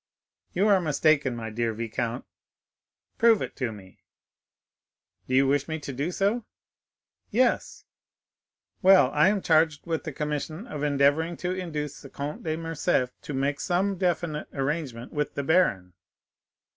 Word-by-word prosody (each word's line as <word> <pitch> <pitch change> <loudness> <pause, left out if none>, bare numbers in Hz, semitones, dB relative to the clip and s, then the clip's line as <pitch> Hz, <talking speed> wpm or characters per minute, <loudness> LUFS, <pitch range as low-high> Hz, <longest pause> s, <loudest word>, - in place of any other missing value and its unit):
"You 195 +4 +2
are 195 -3 +5
mistaken, 150 -4 +2
my 110 -1 -5
dear 115 0 -1
viscount." 115 +2 -3 0.9
"Prove 230 -2 +6
it - - -5
to 125 -4 -1
me." 95 -3 -13 1.3
"Do 130 - 0
you 135 +1 +5
wish 140 +1 +1
me 160 -1 -3
to 145 -3 -7
do 140 +6 -2
so?" 200 +6 0 0.9
"Yes." 245 +3 0 1.0
"Well, 185 -9 +6
I 150 +4 +4
am 200 -2 0
charged 155 -2 +3
with 165 -2 -2
the 155 - -4
commission 150 - -4
of 150 - -6
endeavoring 150 +3 +2
to 180 - +1
induce 155 -6 -4
the 140 - -11
Comte 145 +3 -5
de 155 -1 -2
Morcerf 165 -6 0
to 150 - -6
make 140 +2 0
some 190 +1 0
definite 170 -4 -1
arrangement 135 -4 -3
with 150 -1 -2
the 140 - -2
baron." 115 - +2
150 Hz, 145 wpm, -26 LUFS, 135-175 Hz, 1.3 s, Prove